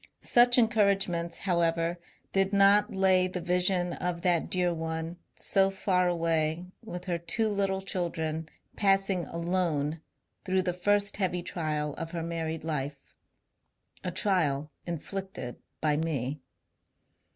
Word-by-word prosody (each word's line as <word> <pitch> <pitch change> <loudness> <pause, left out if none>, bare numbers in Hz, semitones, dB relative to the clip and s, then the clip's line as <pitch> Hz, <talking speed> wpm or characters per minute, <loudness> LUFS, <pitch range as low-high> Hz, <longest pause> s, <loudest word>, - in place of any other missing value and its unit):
Such 245 0 +5
encouragements, 195 -7 +2
however, 170 -2 0 0.3
did 195 +1 +1
not 200 +1 +5
lay 190 -1 +4
the 180 0 -4
vision 180 0 +1
of 175 -1 -3
that 175 -3 +2
dear 180 -1 +1
one 160 +1 -4 0.2
so 195 0 +3
far 185 -2 +1
away 165 -1 0 0.2
with 180 -5 -7
her 175 -2 -1
two 220 +6 +1
little 195 -2 0
children 160 -4 -2 0.3
passing 195 -3 +2
alone 165 -3 -1 0.4
through 185 -1 +1
the 180 -1 -1
first 205 +3 +1
heavy 180 -3 -1
trial 150 -4 -2
of 165 +1 -5
her 165 -1 -3
married 165 -1 -3
life 140 -3 -4 0.4
— - - -34
a 180 - -1
trial 155 -6 +1 0.2
inflicted 170 -5 -5 0.2
by 150 -2 +2
me. 145 -3 -2
175 Hz, 130 wpm, -29 LUFS, 160-195 Hz, 0.4 s, Such